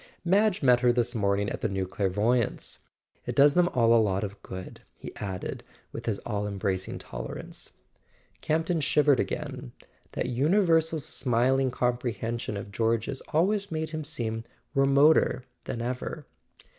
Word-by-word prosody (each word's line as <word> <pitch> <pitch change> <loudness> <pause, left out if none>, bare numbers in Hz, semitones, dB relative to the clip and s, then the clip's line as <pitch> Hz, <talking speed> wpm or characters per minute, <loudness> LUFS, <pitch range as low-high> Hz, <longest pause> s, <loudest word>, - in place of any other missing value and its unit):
Madge 195 0 +3
met 125 -2 +6
her 125 -1 +4
this 120 -1 0
morning 100 -2 +1
at - - -4
the 110 - 0
new 95 -1 -1
clairvoyantss 105 +5 0 0.2
.— - - -42
It - - -3
does 140 +1 +6
them 175 +1 +4
all 115 -5 +3
a 115 - +6
lot 100 -2 0
of 100 0 -6
good," 95 0 -8
he - - -10
added, 95 -2 -5 0.3
with - - -7
his 110 -3 0
all 105 -3 -2
embracing 95 -2 -2
tolerance. - - -8 0.7
Camp 160 +1 0
ton 170 -2 0
shivered 145 -1 +3
again. - - -4 0.4
That - - -1
universal 160 - +2
smiling 130 0 +1
comprehension 120 -3 -2
of 100 0 -7
George's 115 +5 0
always 200 +5 +1
made 155 0 -3
him 155 -1 -4
seem 115 -7 -3 0.3
remoter 140 0 +4 0.2
than 115 - -4
ever. 130 +4 -4
125 Hz, 150 wpm, -28 LUFS, 105-150 Hz, 0.7 s, met